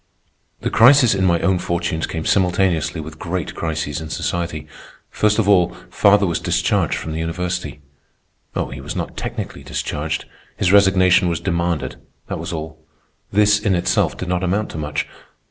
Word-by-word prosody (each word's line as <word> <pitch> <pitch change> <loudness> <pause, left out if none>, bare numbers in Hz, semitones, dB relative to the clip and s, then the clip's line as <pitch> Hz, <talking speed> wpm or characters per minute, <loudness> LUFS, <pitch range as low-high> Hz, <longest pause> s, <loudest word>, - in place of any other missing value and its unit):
The - - -2
crisis 125 0 +6
in 95 -1 +1
my 85 -1 +3
own 95 -2 +2
fortunes 85 -2 -2
came 80 -1 -4
simultaneously 90 -3 +1
with 80 0 -8
great 90 -1 -3
crises 80 -2 -3
in 80 - -7
society. 85 -2 -3 0.5
First 105 0 +2
of 110 -3 +1
all, 90 -4 +4 0.2
father 100 0 +4
was 85 -3 -1
discharged - - +1
from 80 - -5
the 80 - -3
university. 85 -2 -3 0.7
Oh, - - -2
he 70 +1 -7
was - - -6
not - - -4
technically - - -5
discharged. 75 +1 -3 0.3
His 90 - +2
resignation 95 -2 +5
was 85 -2 -1
demanded, 85 -2 -2 0.3
that - - -3
was - - -5
all. 80 0 -6 0.5
This, 105 0 +4
in 105 -3 +1
itself, 85 - +1
did 90 - -5
not 90 0 0
amount 100 +4 -1
to 80 - -6
much. 75 0 -2
85 Hz, 165 wpm, -20 LUFS, 80-95 Hz, 0.7 s, crisis